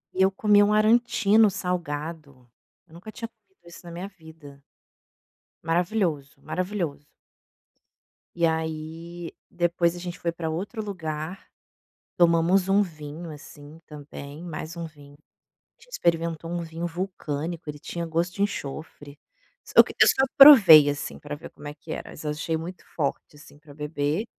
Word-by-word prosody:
E 190 - +1
eu 190 - +6
comi 205 +1 +4
um 205 0 +3
arancino 215 -1 +4
salgado, 155 -7 -5 0.4
eu 160 - -21
nunca 180 +6 -10
tinha 230 - -6
comido 200 -6 -41
isso 170 - -13
na 170 - -10
minha 175 +3 -6
vida. 160 -7 -15 1.1
Maravilhoso, 170 -5 0
maravilhoso. 180 -6 -3 1.3
E 170 -1 +3
aí 160 +1 -4 0.2
depois 175 0 0
a - - -7
gente 175 0 -6
foi 170 - -2
para 165 -1 -4
outro 200 +7 -4
lugar, 165 -3 -6 0.7
tomamos 175 +2 +3
um 200 +1 +4
vinho, 160 -1 -8
assim, 150 +1 -12
também, 145 0 -10
mais 165 0 -7
um 170 - -5
vinho. 145 -2 -15 0.6
A 465 - -34
gente - - -22
experimentou 165 - -1
um 175 0 -3
vinho 165 +1 -5
vulcânico, 170 -3 -5
ele 150 0 -6
tinha 170 +2 -5
gosto 170 +2 -1
de 200 - +1
enxofre. 145 -5 -6 0.5
Só - - +7
que - - -9
eu - - +8
só 265 - +4
provei, 200 - +10
assim, 145 0 -4
pra 145 0 -6
ver 145 - -11
como 145 - -12
é 145 - -6
que 145 - -12
era, - - -6
mas 155 - -10
eu 150 - -2
achei 155 +2 -2
muito 170 +3 -7
forte, 150 -1 -3
assim, 145 0 -16
para 150 -2 -15
beber. 150 +5 -2
165 Hz, 155 wpm, -25 LUFS, 150-185 Hz, 1.3 s, provei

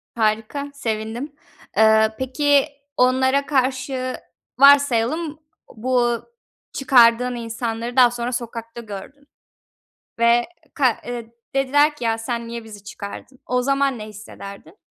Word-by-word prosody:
Harika, 225 +6 -1
sevindim. 235 +2 -4 0.4
Eee, 220 0 +5
peki 280 +2 +2 0.3
onlara 260 +2 +3
karşı 260 -1 -1 0.4
varsayalım 285 +3 +4 0.3
bu 245 +1 0 0.6
çıkardığın 250 -2 +4
insanları 230 0 -4
daha 250 -2 +6
sonra 240 0 -3
sokakta 235 -1 -6
gördün 230 +7 -10 0.9
ve 235 +1 +4 0.3
ka 255 -6 +2
eee, 235 -1 -6 0.2
dediler 290 +3 +3
ki 295 - -8
ya 225 -1 +1
sen 235 +1 -4
niye 235 0 -6
bizi 210 -2 -12
çıkardın? 205 +5 -9
O 250 0 0
zaman 275 0 +1
ne 215 - -6
hissederdin? 205 - -11
245 Hz, 115 wpm, -21 LUFS, 225-270 Hz, 0.9 s, daha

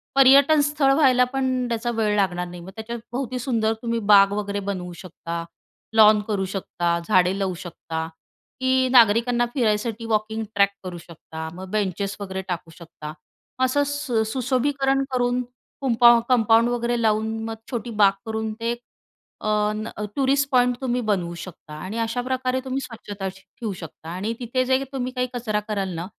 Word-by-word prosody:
पर्यटनस्थळ 280 +1 +5
व्हायला 260 -3 +5
पणं 260 -2 0
त्याचा 235 +1 -1
वेळ 220 -2 +1
लागणार 180 -3 0
नाही. 175 0 -9
त्याच्यात 235 +2 -6
भोवती 255 0 -3
सुंदर 225 -3 0
तुम्ही 230 -1 -1
बाग 200 0 +7
वगैरे 205 -1 -2
बनवू 180 -2 -5
शकता, 170 -1 -6 0.5
लॉन 215 -1 +7
करू 200 -3 0
शकता, 175 -3 -2
झाडे 185 -2 +3
लावू 190 -2 0
शकता 160 -2 -5 0.5
की 260 0 +2
नागरिकांना 240 0 +5
फिरायसाठी 225 -2 0
वॉकिंग 220 0 -1
ट्रॅक 200 -1 +5
करू 180 -2 -6
शकता. 160 -1 -9
मग 185 +1 -9
बेंचेस 200 -1 -1
वगैरे 190 -1 -4
टाकू 170 -2 -4
शकता. 160 -3 -9 0.5
असं 260 +3 +3
सु 280 -6 -1
सुशोभीकरण 270 +2 +1
करून 245 0 +1 0.4
कुंपा 240 -2 +6
कंपाऊंड 230 -1 +4
वगैरे 240 0 -1
लावून 220 0 +1
मग 225 0 -4 0.2
छोटी 240 -1 -3
बाग 200 -1 +7
करून 220 -1 -3
ते 235 +1 0 0.7
अ, - - 0 0.3
न 215 +1 -4 0.3
टुरिस्ट 275 0 +2
पॉइंट 250 -1 +4
तुम्ही 250 -1 0
बनवू 180 -5 0
शकता 165 -2 -10
आणि 205 +5 -5
अशाप्रकारे 255 +3 -1
तुम्ही 260 +1 -2
स्वच्छता 205 -6 -6
श 190 +1 -14
ठेवू 215 +3 -7
शकता 160 -1 -10
आणि 190 +6 -3
तिथे 250 +1 0
जे 260 +1 +2
तुम्ही 255 -1 -2
काही 250 -1 -1
कचरा 225 -4 -1
कराल 200 -3 -1
ना, 165 +1 -4
225 Hz, 155 wpm, -23 LUFS, 195-250 Hz, 0.7 s, बाग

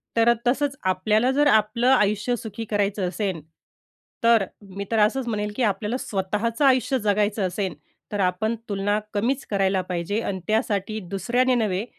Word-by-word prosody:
तर 230 +1 +5
तसंच 275 +2 +1 0.2
आपल्याला 215 +6 +2
जर 290 +2 +3
आपलं 220 +1 +3
आयुष्य 215 0 +2
सुखी 225 0 -6
करायचं 200 -2 0
असेल, 190 -3 -3 0.8
तर 230 -3 +5 0.3
मी 200 0 -4
तर 225 - +2
असंच 250 +3 -2
म्हणेन 210 -2 -2
की 255 - 0
आपल्याला 225 +5 -3
स्वतःचं 210 +6 -1
आयुष्य 260 0 +3
जगायचं 205 -1 +1
असेल, 190 -1 -3 0.4
तर 205 - -2
आपण 195 +5 0
तुलना 205 +1 0
कमीच 245 +7 0
करायला 195 -1 +2
पाहिजे 180 +6 -1
आणि 190 -3 -3
त्यासाठी 215 -1 0
दुसऱ्याने 245 +7 +1
नव्हे, 215 -3 0
215 Hz, 150 wpm, -24 LUFS, 200-235 Hz, 0.8 s, तर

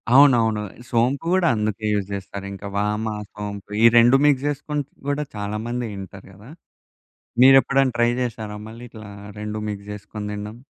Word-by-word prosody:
అవునవును. 120 -6 +5 0.3
సోంపు 125 +6 +1
గూడా 185 -2 +3
అందుకే 110 0 -2
యూజ్ 100 -2 -1
చేస్తారు. 100 0 -6
ఇంకా 100 +1 -8
వామ, 105 +2 0 0.3
సోంపు 105 -1 -7
ఈ - - +8
2 120 +3 +7
మిక్స్ 140 -2 +3
చేసుకొని 145 0 -2 0.2
గూడా 145 +1 0
చాలా 105 +1 -3
మంది 120 0 -2
తింటారు 95 -1 -9
గదా! 105 +6 -15 0.9
మీరెప్పుడైనా 135 0 +6
ట్రై 120 0 +3
చేసారా 110 -3 -4
మళ్ళీ 115 +2 -10
ఇట్లా 110 -2 -11 0.3
2 105 0 -4
మిక్స్ 100 -1 -6
చేసుకొని 105 +1 -7
తినడం. 105 +2 -6
110 Hz, 150 wpm, -22 LUFS, 105-130 Hz, 0.9 s, ఈ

